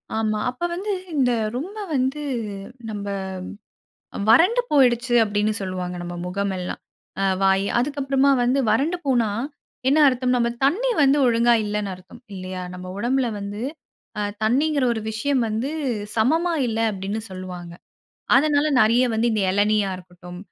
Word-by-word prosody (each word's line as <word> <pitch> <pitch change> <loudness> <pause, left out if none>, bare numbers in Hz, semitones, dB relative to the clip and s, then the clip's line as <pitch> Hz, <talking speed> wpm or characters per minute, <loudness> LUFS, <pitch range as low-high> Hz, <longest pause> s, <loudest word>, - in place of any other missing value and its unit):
ஆமா. 215 -1 0
அப்ப 250 +7 -7
வந்து 390 +4 -3 0.2
இந்த 260 -4 +3 0.2
ரொம்ப 360 +12 -5 0.2
வந்து 265 +3 0 0.7
நம்ப 205 -1 -5 1.2
வறண்டு 360 - +6
போய்டுச்சு 245 -3 +3
அப்டின்னு 210 0 0
சொல்லுவாங்க, 185 -1 -4
நம்ம 175 0 -6
முகம் 200 +2 -2
எல்லாம். 180 0 -5 0.4
அ - - +1 0.2
வாயி. 195 0 +3
அதுக்கு 280 +4 -1
அப்புறமா 270 +1 +3
வந்து 250 +3 +2
வறண்டு 285 +11 +1
போனா, 240 -5 +2 0.6
என்ன 285 +3 +4
அர்த்தம்? 255 -1 +1
நம்ப 235 -1 +2 0.2
தண்ணீ 410 - +2
வந்து 275 +1 +5
ஒழுங்கா 235 0 +4
இல்லன்னு 210 -1 -2
அர்த்தம். 185 +6 -15
இல்லையா, 185 0 -6
நம்ப 180 0 -8
உடம்பில 250 +3 +1
வந்து 205 +2 -5 0.6
அ - - 0 0.2
தண்ணீங்குற 280 +5 +2
ஒரு 225 - -3
விஷயம் 250 +4 0
வந்து 220 +5 -2 0.5
சமமா 320 +10 +2 0.2
இல்ல 225 -1 -2
அப்டின்னு 200 +2 -4
சொல்லுவாங்க. 180 -2 -7 0.6
அதனால, 290 +1 +3
நிறைய 235 +4 +4
வந்து 225 +2 +1
இந்த 215 -2 0
இளநீயா 205 +1 +2
இருக்கட்டும், 180 0 -12
230 Hz, 140 wpm, -23 LUFS, 200-270 Hz, 1.2 s, வறண்டு